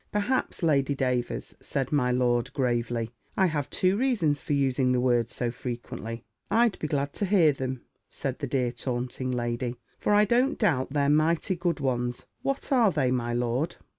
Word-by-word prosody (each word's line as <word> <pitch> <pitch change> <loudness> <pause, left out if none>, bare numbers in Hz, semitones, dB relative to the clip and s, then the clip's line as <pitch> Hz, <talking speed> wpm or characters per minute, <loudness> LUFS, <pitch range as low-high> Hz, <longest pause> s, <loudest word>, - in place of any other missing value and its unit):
"Perhaps, 210 -1 -1
Lady 140 -3 +2
Davers," 125 -2 -1
said 135 -2 -2
my 140 -4 +2
lord, 125 0 +1
gravely, 120 -3 -1 0.3
"I 190 - +5
have 150 -5 -1
two 185 0 +2
reasons 205 - +1
for - - -2
using 130 -2 +2
the 125 - +2
word 120 -2 +2
so 120 0 -2
frequently." 120 -2 -6 0.3
"I'd 230 -2 +3
be 155 - -2
glad 140 -1 -1
to 205 - -1
hear 180 -6 +5
them," 130 -2 -4 0.3
said 135 -3 -4
the 140 - -3
dear 125 -2 0
taunting 125 +1 -3
lady; 120 0 -2 0.2
"for 210 - +2
I 210 +1 +6
don't 245 +6 +2
doubt 140 - +1
they're 140 -1 +2
mighty 155 +5 +2
good 175 -1 -1
ones. 125 -3 -1 0.2
What 275 +1 -2
are 240 -5 +5
they, 135 -6 +1
my 120 -2 -1
lord?" 125 +6 -1
135 Hz, 175 wpm, -27 LUFS, 125-165 Hz, 0.3 s, I